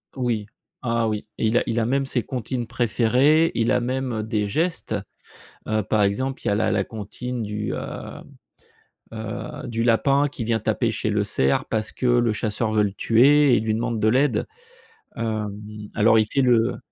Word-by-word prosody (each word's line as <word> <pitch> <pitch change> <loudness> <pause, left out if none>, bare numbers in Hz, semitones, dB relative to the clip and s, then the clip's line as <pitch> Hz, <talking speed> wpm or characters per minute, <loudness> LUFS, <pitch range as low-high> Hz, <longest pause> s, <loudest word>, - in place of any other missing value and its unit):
Oui. 120 -5 -1 0.4
Ah 115 -1 +1
oui, 105 -1 -3
il 110 +2 +2
a - - +3
il 115 - -1
a 115 - +1
même 135 +2 +1
ses 130 -2 -1
comptines 125 -1 -4
préférées, 130 +7 +3
il 115 0 +1
a - - +3
même, 125 -2 -2
des 105 -1 -1
gestes, 165 - -1 0.7
heu, 110 0 +1
par 105 +1 +1
exemple, 130 +7 -1
il - - 0
y - - +2
a - - +2
la 105 - +1
la 100 -2 +1
comptine 120 +4 -6
du, 105 0 -3
heu - - -3 1.3
heu 110 +2 -6
du 115 -1 -2
lapin 135 +5 +3
qui 135 -4 -6
vient 115 0 0
taper - - 0
chez - - -2
le - - +1
cerf. 65 +1 +1
Parce 110 -1 -2
que - - -5
le 120 -2 +3
chasseur 110 +1 -2
veut 105 -1 +3
le 100 - 0
tuer 135 +6 +5
et - - +3
lui 110 0 -1
demande 115 0 -1
de 110 - +2
l'aide, 130 +5 +2 0.7
hem, 110 -3 -3 0.4
alors 110 +1 +4
il 110 - +3
fait 135 +6 0
le 120 -2 +3
115 Hz, 190 wpm, -23 LUFS, 110-125 Hz, 1.3 s, tuer